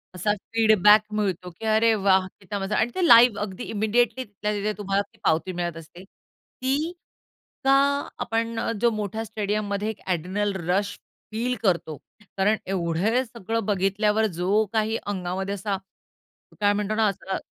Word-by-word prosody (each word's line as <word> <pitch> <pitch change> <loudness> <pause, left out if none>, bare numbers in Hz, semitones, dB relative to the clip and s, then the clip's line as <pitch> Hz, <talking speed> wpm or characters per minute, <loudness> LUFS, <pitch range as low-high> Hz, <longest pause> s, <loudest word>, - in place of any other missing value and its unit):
असा 205 +4 0 0.2
फीडबॅक 215 -2 +6
मिळतो, 190 -4 -1
की 180 +6 -10
अरे 220 +1 +4
वाह! 190 -2 +3
किती 200 +1 -5
मजा 195 +2 -2
आणि 220 +2 +1
ते 370 - +1
लाईव्ह 235 -4 +7
अगदी 210 +2 -5
इमिडिएटली 225 +4 0
तिथल्या 210 -1 -4
तिथे 210 +1 -1
तुम्हाला 200 -1 0
ती - - -24
पावती 165 +4 +1
मिळत 175 -1 -3
असते. 165 +3 -12
ती 270 - -5 0.7
का 270 - +5 0.5
आपण 230 0 -1
अ, - - -1
जो 240 - +5
मोठ्या 215 0 -3
स्टेडियममध्ये 210 -1 -2
एक 220 - -6
एड्रेनल 190 +4 -1 0.2
रश 200 +3 0 0.3
फील 240 +3 -1
करतो, 170 -6 0 0.4
कारण 205 +3 +3
एवढे 190 +6 0
सगळं 225 -1 -4
बघितल्यावर 210 +2 +1
जो 200 +5 +2
काही 220 0 +1
अंगामध्ये 190 0 -3
असा 200 0 -2 0.8
काय 205 0 +4
म्हणतो 210 +1 -1
ना, 220 -1 +3
असा 195 -1 -3
205 Hz, 150 wpm, -25 LUFS, 190-220 Hz, 0.8 s, लाईव्ह